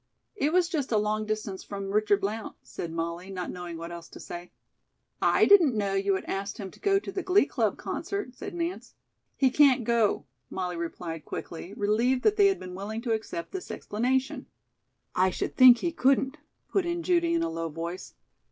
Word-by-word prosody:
"It 305 Hz, -7 st, +1 dB
was 360 Hz, 0 st, +3 dB
just 310 Hz, -8 st, -2 dB
a 220 Hz, -, +3 dB
long 215 Hz, +1 st, 0 dB
distance 215 Hz, -3 st, -3 dB
from 195 Hz, -1 st, -5 dB
Richard 210 Hz, -1 st, +3 dB
Blount," 210 Hz, +2 st, -3 dB
said 165 Hz, -, -6 dB
Molly, 170 Hz, +3 st, -4 dB
not 185 Hz, -2 st, -4 dB
knowing 175 Hz, -2 st, -6 dB
what 170 Hz, +1 st, -7 dB
else 170 Hz, -1 st, -9 dB
to -, -, -12 dB
say. 175 Hz, +1 st, -8 dB, 0.7 s
"I -, -, +5 dB
didn't 335 Hz, -, +6 dB
know 200 Hz, -2 st, 0 dB
you 195 Hz, 0 st, +2 dB
had -, -, -4 dB
asked 200 Hz, +2 st, -3 dB
him 195 Hz, -3 st, -6 dB
to -, -, -18 dB
go 395 Hz, -1 st, +3 dB
to 390 Hz, 0 st, -4 dB
the 385 Hz, -, -3 dB
Glee 380 Hz, +2 st, +4 dB
Club -, -, 0 dB
concert," 395 Hz, -11 st, -4 dB
said 395 Hz, +6 st, -7 dB
Nance. 340 Hz, +1 st, -4 dB, 0.4 s
"He 265 Hz, -2 st, +4 dB
can't 265 Hz, -3 st, +5 dB
go," 230 Hz, -2 st, +2 dB, 0.2 s
Molly 180 Hz, -1 st, -3 dB
replied 165 Hz, -1 st, -5 dB
quickly, 175 Hz, +4 st, -7 dB
relieved 235 Hz, +4 st, +1 dB
that 430 Hz, -, +4 dB
they 405 Hz, -2 st, +6 dB
had 390 Hz, -, +1 dB
been 180 Hz, -1 st, -8 dB
willing 210 Hz, +4 st, -5 dB
to 240 Hz, -, -1 dB
accept 220 Hz, -6 st, -4 dB
this 380 Hz, -2 st, -6 dB
explanation. 255 Hz, +5 st, -1 dB, 0.7 s
"I 185 Hz, +1 st, +3 dB
should -, -, -3 dB
think 255 Hz, -1 st, +9 dB
he 340 Hz, +7 st, -1 dB
couldn't," 270 Hz, -1 st, +2 dB, 0.3 s
put 390 Hz, -, +2 dB
in 345 Hz, 0 st, -2 dB
Judy, 340 Hz, -1 st, +2 dB
in 335 Hz, -, +1 dB
a -, -, 0 dB
low 165 Hz, 0 st, -3 dB
voice. 170 Hz, +3 st, -6 dB
215 Hz, 200 wpm, -28 LUFS, 185-300 Hz, 0.7 s, think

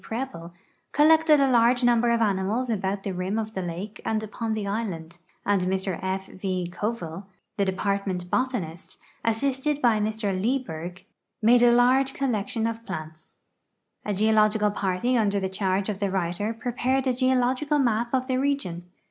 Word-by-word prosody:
Preble, 225 Hz, -8 st, -5 dB, 0.4 s
collected 315 Hz, 0 st, +5 dB
a 275 Hz, -, +4 dB
large 240 Hz, +1 st, +4 dB
number 240 Hz, -1 st, +4 dB
of 235 Hz, 0 st, +2 dB
animals 210 Hz, +4 st, 0 dB
about 195 Hz, -1 st, -2 dB
the 195 Hz, -, -3 dB
rim 185 Hz, +4 st, -2 dB
of 220 Hz, -1 st, -3 dB
the 190 Hz, -, -3 dB
lake 180 Hz, +4 st, -6 dB
ami 220 Hz, -1 st, 0 dB
upon 220 Hz, +1 st, -3 dB
the 215 Hz, -2 st, -3 dB
island, 185 Hz, -5 st, -4 dB, 0.3 s
and 200 Hz, -2 st, +2 dB
Mr 190 Hz, 0 st, -1 dB
F. 190 Hz, +1 st, -2 dB
V. 185 Hz, -2 st, -3 dB
Coville, 190 Hz, -3 st, -4 dB, 0.3 s
the 200 Hz, -, +2 dB
Department 190 Hz, -1 st, -1 dB
Botanist, 210 Hz, -11 st, -2 dB, 0.3 s
assisted 265 Hz, +5 st, 0 dB
by 235 Hz, -5 st, +3 dB
MrLieburg, 205 Hz, -4 st, -2 dB, 0.4 s
made 235 Hz, +2 st, +5 dB
a 240 Hz, 0 st, +6 dB
large 255 Hz, +3 st, +4 dB
collection 225 Hz, -3 st, -1 dB
of 230 Hz, 0 st, -3 dB
plants. 155 Hz, -6 st, -8 dB, 0.7 s
A 205 Hz, -, -2 dB
geological 215 Hz, 0 st, +3 dB
j)arty 205 Hz, +5 st, 0 dB
under 200 Hz, -2 st, +1 dB
the 190 Hz, -, -1 dB
charge 190 Hz, 0 st, 0 dB
of 205 Hz, -3 st, -3 dB
the 200 Hz, -2 st, 0 dB
writer 190 Hz, +4 st, -1 dB
i>re})ared 255 Hz, +2 st, 0 dB
a 260 Hz, -, +2 dB
geological 255 Hz, +3 st, +1 dB
map 235 Hz, -3 st, +1 dB
of 260 Hz, -1 st, +1 dB
the 255 Hz, -1 st, 0 dB
region. 260 Hz, -11 st, -1 dB
215 Hz, 155 wpm, -25 LUFS, 190-245 Hz, 0.7 s, a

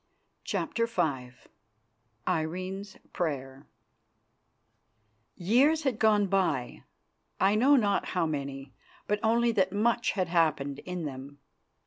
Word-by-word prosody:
CHAPTER 230 Hz, 0 st, -1 dB
V 150 Hz, -, -1 dB, 1.0 s
IRENE'S 185 Hz, +4 st, -3 dB, 0.2 s
PRAYER 135 Hz, -4 st, -4 dB, 1.7 s
Years 270 Hz, -, +3 dB
had 260 Hz, -6 st, -1 dB
gone 210 Hz, -2 st, +4 dB
by, 180 Hz, -10 st, -1 dB, 0.5 s
I 195 Hz, +1 st, +4 dB
know 260 Hz, +7 st, +5 dB
not 205 Hz, -6 st, +2 dB
how 180 Hz, -2 st, -1 dB
many, 140 Hz, -3 st, -5 dB, 0.3 s
but 210 Hz, 0 st, 0 dB
only 235 Hz, +1 st, +3 dB
that 190 Hz, -4 st, +1 dB
much 235 Hz, +4 st, +1 dB
had 185 Hz, -3 st, -1 dB
happened 155 Hz, -5 st, +1 dB
in 180 Hz, -2 st, -4 dB
them. 140 Hz, 0 st, -8 dB
185 Hz, 105 wpm, -29 LUFS, 145-215 Hz, 1.7 s, know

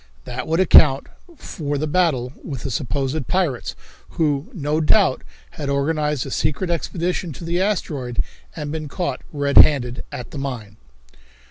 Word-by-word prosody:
That 125 Hz, -, -5 dB
would 165 Hz, +2 st, +1 dB
account 150 Hz, -6 st, +6 dB, 0.3 s
for 145 Hz, -, -4 dB
the 150 Hz, -, -1 dB
battle 150 Hz, -6 st, +1 dB
with 135 Hz, -6 st, -6 dB
the 135 Hz, -, -3 dB
supposed 135 Hz, +4 st, -2 dB
pirates, 175 Hz, -10 st, -1 dB, 0.4 s
who, 150 Hz, 0 st, +1 dB
no 155 Hz, -, -1 dB
doubt, 170 Hz, -2 st, +3 dB, 0.3 s
had 145 Hz, -2 st, -5 dB
organized 150 Hz, 0 st, 0 dB
a -, -, -6 dB
secret 175 Hz, +4 st, -1 dB
expedition 170 Hz, 0 st, -2 dB
to 150 Hz, -, -10 dB
the 170 Hz, +2 st, 0 dB
asteroid 145 Hz, -, -2 dB, 0.4 s
and 150 Hz, -2 st, -4 dB
been 155 Hz, -1 st, -4 dB
caught 140 Hz, -3 st, -3 dB
red 145 Hz, -1 st, -1 dB
handed 125 Hz, -5 st, +5 dB
at 125 Hz, -, -7 dB
the 145 Hz, -, -6 dB
mine. 115 Hz, -7 st, -5 dB
150 Hz, 150 wpm, -21 LUFS, 135-165 Hz, 0.4 s, account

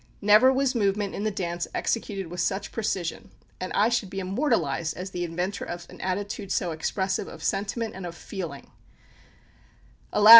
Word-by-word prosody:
Never 210 Hz, +6 st, +7 dB
was 265 Hz, 0 st, +2 dB
movement 200 Hz, -3 st, +1 dB
in 205 Hz, -, -2 dB
the -, -, +3 dB
dance 175 Hz, -4 st, -2 dB
executed 200 Hz, -4 st, 0 dB
with 175 Hz, +2 st, -6 dB
such 195 Hz, +2 st, 0 dB
precision; 190 Hz, -6 st, -2 dB, 0.3 s
and 185 Hz, -, -3 dB
I 210 Hz, +3 st, +5 dB
should 235 Hz, -5 st, +1 dB
be 195 Hz, -, -3 dB
immortalised 185 Hz, -, +1 dB
as 185 Hz, +2 st, -4 dB
the 175 Hz, -1 st, -2 dB
inventor 175 Hz, +4 st, -2 dB
of 175 Hz, 0 st, -5 dB
an -, -, -10 dB
attitude 200 Hz, +1 st, -2 dB
so 175 Hz, -3 st, +1 dB
expressive 190 Hz, +4 st, 0 dB
of -, -, -9 dB
sentiment 215 Hz, +3 st, 0 dB
and 190 Hz, -1 st, -5 dB
of 170 Hz, -, -7 dB
feeling. 170 Hz, -7 st, -6 dB, 1.4 s
Alas! 210 Hz, +1 st, +6 dB
195 Hz, 165 wpm, -27 LUFS, 175-210 Hz, 1.4 s, Never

